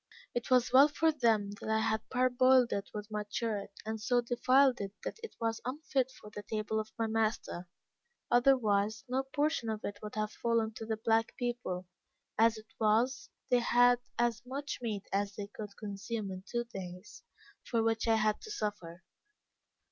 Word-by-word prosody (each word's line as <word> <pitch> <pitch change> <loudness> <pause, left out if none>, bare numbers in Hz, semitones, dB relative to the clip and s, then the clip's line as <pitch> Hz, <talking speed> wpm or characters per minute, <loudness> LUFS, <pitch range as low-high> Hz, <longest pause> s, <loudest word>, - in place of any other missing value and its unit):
It 240 - -3
was 250 -1 +3
well 275 +3 +9
for 320 +2 +2
them 225 -8 +2
that - - -5
I 220 - +3
had 220 0 -1
parboiled 255 0 +4
it 200 0 -3
with 210 0 -7
my 210 0 -2
shirt, 210 -2 -2 0.2
and 220 0 -4
so 245 +3 +2
defiled 250 +1 +3
it 195 0 -4
that - - -5
it 455 - -8
was 225 -1 -1
unfit 265 -1 -1
for 210 - -12
the 205 - -6
table 215 +1 -2
of 215 0 -5
my 225 - +1
master, 220 -5 -1 0.6
otherwise, 220 -4 +3
no 255 +2 +1
portion 285 -2 -1
of 215 -1 -3
it 205 0 -5
would 210 0 -7
have 215 0 -1
fallen 230 -2 0
to 225 - -6
the 220 -1 -1
black 225 0 +1
people 240 -7 -3 0.5
as 225 0 +4
it 220 +1 -14
was, 225 +4 +2 0.2
they 250 - +6
had 245 +1 +5 0.2
as 235 -2 +1
much 275 +3 -5
meat 210 -4 -3
as 200 0 0
they 205 - -4
could 210 -2 -8
consume 205 0 -4
in 185 0 -7
two 240 0 -1
days, 190 -4 -9 0.4
for 230 -2 0
which 225 0 +1
I 225 - +5
had 215 -1 +1
to - - -10
suffer. 185 - -4
225 Hz, 180 wpm, -32 LUFS, 210-245 Hz, 0.6 s, well